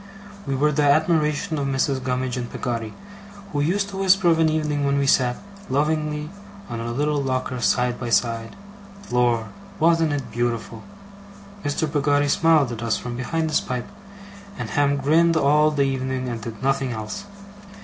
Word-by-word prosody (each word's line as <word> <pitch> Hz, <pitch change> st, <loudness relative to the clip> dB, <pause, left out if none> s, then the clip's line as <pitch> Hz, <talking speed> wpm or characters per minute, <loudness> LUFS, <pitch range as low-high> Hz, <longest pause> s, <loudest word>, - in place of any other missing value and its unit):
We 135 Hz, -, 0 dB
were 150 Hz, +3 st, +2 dB
the 150 Hz, +1 st, +1 dB
admiration 150 Hz, +1 st, +2 dB
of 140 Hz, -, -1 dB
Mrs. 135 Hz, 0 st, 0 dB
Gummidge 125 Hz, 0 st, -1 dB
and 125 Hz, -2 st, -5 dB
Peggotty, 115 Hz, -3 st, -4 dB, 0.6 s
who 145 Hz, -, 0 dB
used 195 Hz, +6 st, 0 dB
to 195 Hz, -, -7 dB
whisper 190 Hz, -2 st, +4 dB
of 165 Hz, -1 st, +3 dB
an 160 Hz, -1 st, +4 dB
evening 150 Hz, -2 st, -1 dB
when 140 Hz, 0 st, +1 dB
we 140 Hz, -, +1 dB
sat, 125 Hz, -2 st, +3 dB, 0.3 s
lovingly, 150 Hz, +2 st, -1 dB, 0.4 s
on 115 Hz, -, -4 dB
our 115 Hz, -, -4 dB
little 145 Hz, +4 st, 0 dB
locker 130 Hz, -1 st, -2 dB
side 125 Hz, +1 st, +1 dB
by 120 Hz, -, -4 dB
side, 115 Hz, -1 st, 0 dB, 0.6 s
'Lor! 120 Hz, -2 st, +1 dB, 0.3 s
wasn't 165 Hz, -1 st, +3 dB
it 140 Hz, -3 st, -4 dB
beautiful!' 115 Hz, -2 st, -2 dB, 0.8 s
Mr. 145 Hz, +2 st, 0 dB
Peggotty 145 Hz, -1 st, +1 dB
smiled 155 Hz, -4 st, +3 dB
at 115 Hz, -1 st, -6 dB
us 115 Hz, -1 st, 0 dB
from 125 Hz, -1 st, -6 dB
behind 160 Hz, +6 st, -2 dB
his -, -, +2 dB
pipe, 125 Hz, -2 st, -4 dB, 0.7 s
and -, -, -5 dB
Ham 145 Hz, -2 st, +2 dB
grinned 160 Hz, +4 st, +3 dB
all 150 Hz, +1 st, +4 dB
the 145 Hz, -2 st, +1 dB
evening 130 Hz, -1 st, -2 dB
and 115 Hz, -2 st, -4 dB
did 110 Hz, +1 st, -8 dB
nothing 135 Hz, -2 st, 0 dB
else. 110 Hz, -, -6 dB
140 Hz, 170 wpm, -23 LUFS, 125-150 Hz, 0.8 s, whisper